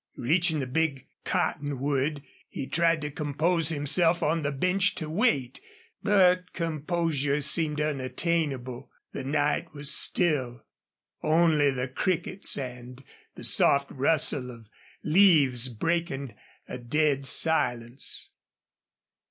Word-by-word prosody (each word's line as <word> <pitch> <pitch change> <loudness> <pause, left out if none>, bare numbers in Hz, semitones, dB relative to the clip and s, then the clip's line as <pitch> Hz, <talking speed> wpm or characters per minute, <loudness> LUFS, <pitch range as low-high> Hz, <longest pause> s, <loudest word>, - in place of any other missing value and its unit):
Reaching 160 +5 +1
the 140 - -2
big 145 0 -2 0.2
cottonwood, 145 +1 -2 0.3
he 135 - -6
tried 165 +1 +1
to 150 0 -5
compose 155 +3 0
himself 165 +3 +1
on 165 +2 0
the 145 -1 -2
bench 185 +7 +1
to 155 - -5
wait. 150 - 0 0.4
But 185 -3 +2
composure 155 -3 -1
seemed 150 +1 0
unattainable. 135 -2 -2 0.2
The - - -6
night 145 +2 -1
was 145 0 +1
still, 130 -11 0 0.6
only 155 -2 +3
the 130 -1 -3
crickets 175 +7 -1
and 125 -1 -8 0.3
the - - -11
soft 140 0 +3
rustle 140 -2 +1
of 115 -3 -13 0.3
leaves 150 -8 +4
breaking 140 0 -3 0.3
a 125 - -7
dead 140 +2 0
silence. 125 -5 +1
150 Hz, 110 wpm, -26 LUFS, 130-165 Hz, 0.6 s, leaves